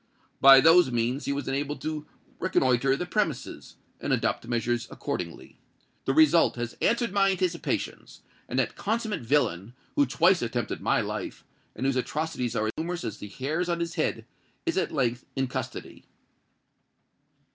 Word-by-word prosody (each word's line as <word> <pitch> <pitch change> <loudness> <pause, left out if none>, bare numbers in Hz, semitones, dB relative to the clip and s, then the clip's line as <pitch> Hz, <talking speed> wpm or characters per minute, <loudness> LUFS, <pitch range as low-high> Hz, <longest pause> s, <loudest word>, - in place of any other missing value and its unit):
By 135 0 +9
those 165 0 +6
means 120 +4 -1
he - - -1
was 140 0 -3
enabled 140 +2 -2
to 155 -1 -4 0.3
reconnoitre 135 -6 +2
the 180 - -3
premises, 175 - -3 0.2
and - - -3
adopt - - 0
measures 120 0 -1
accordingly. 85 -2 -6 0.5
The 135 - 0
result 160 +1 +5
has 120 -1 -4
answered 235 -2 +2
my 195 0 +3
anticipations; 180 -3 -2 0.3
and - - -3
that - - 0
consummate 220 - -2
villain, 115 - 0 0.2
who 145 - +3
twice 170 +8 +3
attempted 120 -1 -3
my - - +2
life, - - -5 0.3
and 125 - -3
whose 135 -1 +1
atrocities 130 -3 -2
are 110 0 0
numerous 175 +2 -3
as 105 -1 -5
the 105 - -7
hairs 155 - -2
on 170 -1 0
his 170 0 -2
head, - - -1 0.4
is 335 - 0
at - - 0
length 125 -4 0
in 135 -1 +1
custody." 125 - -6
140 Hz, 155 wpm, -27 LUFS, 120-170 Hz, 0.5 s, By